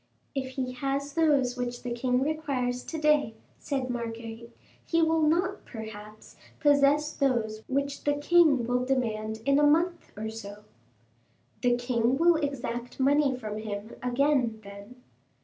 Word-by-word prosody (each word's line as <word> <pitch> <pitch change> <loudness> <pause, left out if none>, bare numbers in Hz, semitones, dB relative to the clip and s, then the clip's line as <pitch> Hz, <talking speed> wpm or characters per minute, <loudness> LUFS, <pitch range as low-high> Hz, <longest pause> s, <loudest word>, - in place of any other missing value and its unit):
"If 265 -2 -3
he 255 -1 -2
has 275 +2 -3
those 285 -6 +2
which 245 -1 -4
the 245 - -4
king 250 +1 0
requires 275 -5 -2
to 325 - -5
day," 300 -7 +2 0.2
said 270 -3 -2
Marguerite, 230 -1 -6 0.3
"he 335 - 0
will 320 0 +2
not, 350 +6 +1
perhaps, 215 -2 -10 0.2
possess 290 +1 +3
those 230 -6 0
which 280 +1 -2
the 290 0 +2
king 290 -4 +4
will 250 +1 0
demand 220 -4 -2
in 275 +1 +4
a - - +3
month 335 +4 +2
or 220 +1 -4
so." 210 -2 -9 1.0
"The 245 -1 +3
king 245 0 +1
will 335 +1 +5
exact 245 -5 -4
money 280 0 +3
from 215 -3 -5
him 215 0 -6
again, 250 -2 +1
then?" 200 +4 -11
255 Hz, 145 wpm, -28 LUFS, 230-290 Hz, 1.0 s, will